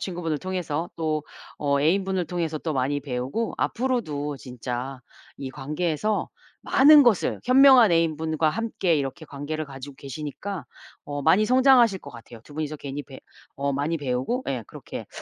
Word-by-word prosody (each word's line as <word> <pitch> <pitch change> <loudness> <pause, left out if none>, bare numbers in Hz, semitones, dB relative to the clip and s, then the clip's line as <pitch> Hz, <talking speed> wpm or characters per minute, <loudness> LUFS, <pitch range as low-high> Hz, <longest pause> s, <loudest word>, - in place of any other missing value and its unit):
친구분을 170 -5 -3
통해서. 175 -2 -3
또 155 -2 -1 0.4
어 140 -1 +1
애인분을 190 +3 +1
통해서 165 -3 -2
또 160 0 -3
많이 135 +2 0
배우고 135 - -3
앞으로도 155 - -1
진짜 125 +1 -6 0.4
이 135 -1 -5
관계에서 155 +9 -2 0.3
많은 295 +2 +7
것을 240 -7 +2
현명한 255 -5 +7
애인분과 160 -1 +1
함께 200 -4 0
이렇게 145 +4 -4
관계를 150 +2 -5
가지고 140 -1 -9
계시니까 150 +6 -6 0.4
어 145 -1 -4
많이 210 +9 +4
성장하실 250 -6 +5
것 - - -10
같아요. 115 0 -12
2 145 - -14
분이서 155 -1 -3
괜히 140 0 -6
배 135 0 -12 0.4
어 140 0 -1
많이 145 +4 -1
배우고 135 - -2
예 125 -4 -2
그렇게 - - -8
155 Hz, 340 characters per minute, -25 LUFS, 140-190 Hz, 0.4 s, 많은